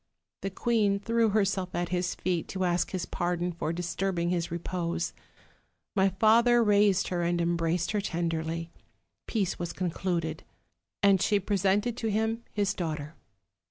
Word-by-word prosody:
The 195 - -2
queen 205 0 +1
threw 230 +2 +2
herself 195 -3 0
at 175 0 -1
his 180 -1 -1
feet, 180 -3 -1
to 190 -1 -3
ask 175 0 +1
his 185 -2 -3
pardon 175 0 -1
for 160 -2 -3
disturbing 175 0 -1
his 170 -2 -1
repose. 170 0 -2 0.8
My 195 -1 +4
father 230 +5 +4
raised 205 -2 +3
her 175 -1 -1
and 170 0 +1
embrac 170 0 +1
ing 165 - -2
her 210 - +1
tenderly, 165 -2 -2 0.6
peace 200 -6 -1
was 175 -1 -3
concluded; 170 -3 -2 0.6
and 195 -2 +5
she 205 0 +3
presented 200 +4 +1
to 225 - -2
him 220 +2 0
his 200 -2 0
daughter. 155 -4 -4
185 Hz, 150 wpm, -29 LUFS, 170-205 Hz, 0.8 s, and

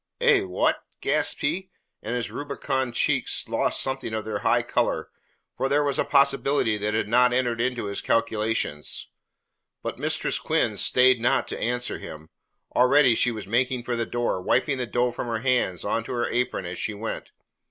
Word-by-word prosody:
"Eh? - - +5
What?" 90 -1 0 0.2
gasped - - +1
he, 180 +6 -1 0.3
and 115 +3 -3
his 120 - -3
rubicund 130 -3 -3
cheeks - - +1
lost - - 0
something 130 -4 -3
of 110 - -3
their 105 -1 -3
high - - +2
colour, - - -1 0.4
for 135 - -1
here 145 +1 +3
was 140 -2 0
a - - +4
possibility 140 -4 +2
that 105 +1 -1
had 110 - 0
not 125 +2 +4
entered 120 -2 0
into 125 -2 -1
his 100 0 -3
calculations. 110 -9 -1 0.7
But - - -4
Mistress - - -1
Quinn - - 0
stayed 125 -1 +4
not 120 - +2
to - - -4
answer 125 +1 -2
him. 80 0 -10 0.5
Already 130 0 +5
she 120 - +2
was 110 -3 -5
making 125 +3 0
for 120 0 -2
the 115 -1 -2
door, 120 -6 -1
wiping 130 +7 +1
the 125 - -2
dough 120 +3 +1
from 120 - -5
her 115 -1 -1
hands 120 -7 0
on 115 - 0
to - - -5
her 120 -1 0
apron 125 -6 -1
as 85 0 -5
she 105 - -2
went. 110 +2 -5
120 Hz, 185 wpm, -25 LUFS, 110-130 Hz, 0.7 s, Eh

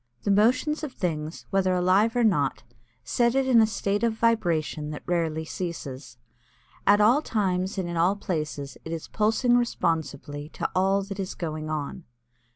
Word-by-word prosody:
The 205 - +1
motions 250 +10 +2
of 285 -4 -4
things 160 -5 -3
whether 190 -2 +2
alive 190 +6 +3
or 245 - +3
not, 220 -3 +1 0.4
set 240 0 +1
it 270 0 +2
in 245 -3 +5
a 220 - +4
state 200 -1 -1
of 230 -1 +2
vibration 170 -10 0
that 150 - -7
rarely 160 -2 -1
ceases. 145 -8 -6 0.7
At 205 +1 +6
all 235 +8 +5
times 190 -7 -1
and 185 -2 -1
in 170 -1 -4
all 175 +4 +3
places 155 -7 -4
it 160 - -5
is 165 - -5
pulsing 225 +3 +2
responsively 150 - -1
to - - -2
all 195 +2 +2
that 195 0 -7
is 190 -1 -4
going 155 -2 -4
on. 155 +3 -4
185 Hz, 165 wpm, -26 LUFS, 160-220 Hz, 0.7 s, At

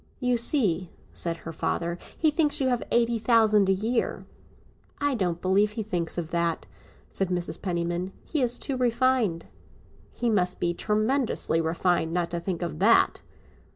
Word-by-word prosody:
"You 250 -2 +1
see," 210 - +2 0.2
said 170 -1 -3
her 165 - -5
father, 170 +2 -2 0.2
"he 315 -2 +3
thinks 300 -1 +1
you 265 -2 +1
have 245 -2 0
eighty 235 -1 +2
thousand 215 -4 +4
a - - +6
year." 220 +5 -1 0.7
"I 285 -1 0
don't 180 -7 -1
believe 200 +3 +2
he 220 - -3
thinks 175 -6 -3
of 170 -2 -4
that," 170 -1 0 0.5
said 195 -2 -1
Mrs. 180 -1 -2
Penniman; 175 0 -2
"he 305 - -1
is 245 -1 0
too 270 - -3
refined." 240 -7 +1 0.7
"He 240 - -3
must 185 -5 +1
be 175 0 0
tremendously 215 -3 0
refined 165 0 0
not 175 -1 -1
to 170 - -2
think 170 0 -3
of 75 - -4
that!" - - +4
195 Hz, 160 wpm, -26 LUFS, 170-240 Hz, 0.7 s, a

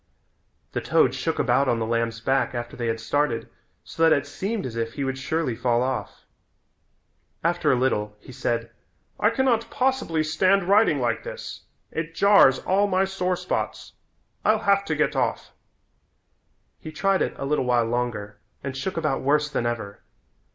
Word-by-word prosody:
The - - -2
toad - - +3
shook - - -2
about 140 0 +2
on 120 - +2
the 115 - -1
lamb's 115 0 -1
back 135 +1 0
after 120 0 -5
they 120 -1 -3
had 115 0 -1
started 115 +1 -1 0.4
so - - -8
that 165 0 +6
it 140 -2 +3
seemed 195 +8 -3
as 120 -3 -5
if 115 0 -3
he 140 - -3
would 135 0 -2
surely 150 -3 -1
fall 120 0 +1
off. 130 0 -4 1.2
After - - +2
a - - +4
little 105 -5 0
he - - -13
said, 115 -1 -2 0.5
"I 210 - +4
can 265 +3 0
not 230 -3 +1
possibly 255 -12 0
stand 185 +5 +2
riding 200 +5 +4
like - - 0
this. - - -8 0.3
It 165 0 -4
jars 200 -9 +6
all 200 +2 +1
my 190 0 +2
sore 185 -1 -1
spots. - - -4 0.5
I'll 215 +1 +2
have 200 0 +3
to 160 - -1
get 150 -1 +1
off." 130 - -1 1.3
He 155 - -8
tried 195 +4 +1
it - - -1
a - - -4
little 145 -2 0
while 120 -2 +2
longer 115 -3 -3 0.2
and 135 -1 -4
shook 165 +9 -4
about 155 -4 0
worse 150 +2 +1
than 120 -4 -1
ever. 110 -4 -5
140 Hz, 175 wpm, -24 LUFS, 120-190 Hz, 1.3 s, that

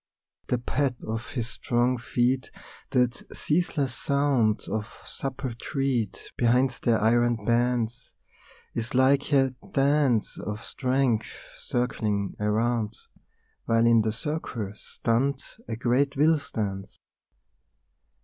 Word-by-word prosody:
The 125 - +1
pad 130 +2 0
of 115 +1 -3
his 120 -5 -3
strong 120 +1 0
feet, 125 +2 0 0.4
that 125 -1 +1 0.2
ceaseless 150 -5 0
sound 140 -7 +1
Of 110 -1 -3 0.2
supple 135 -2 -4
tread 125 -3 -1 0.2
behind 125 +2 +3
the 120 - +3
iron 115 0 +2
bands, 120 0 0 0.6
Is 115 +3 -4
like 135 +3 +3
a 135 -2 +4 0.2
dance 135 -4 +2
of 105 +3 -5
strength 130 -3 0 0.3
circling 110 -5 -1
around, 110 +1 0 0.7
While 115 0 +3
in 115 -1 +6
the 110 0 0
circle, 120 -5 -4
stunned, 130 +6 -1 0.2
a - - -3
great 130 +4 +1
will 155 +2 +4
stands. 100 -8 -4
120 Hz, 110 wpm, -27 LUFS, 115-135 Hz, 0.7 s, in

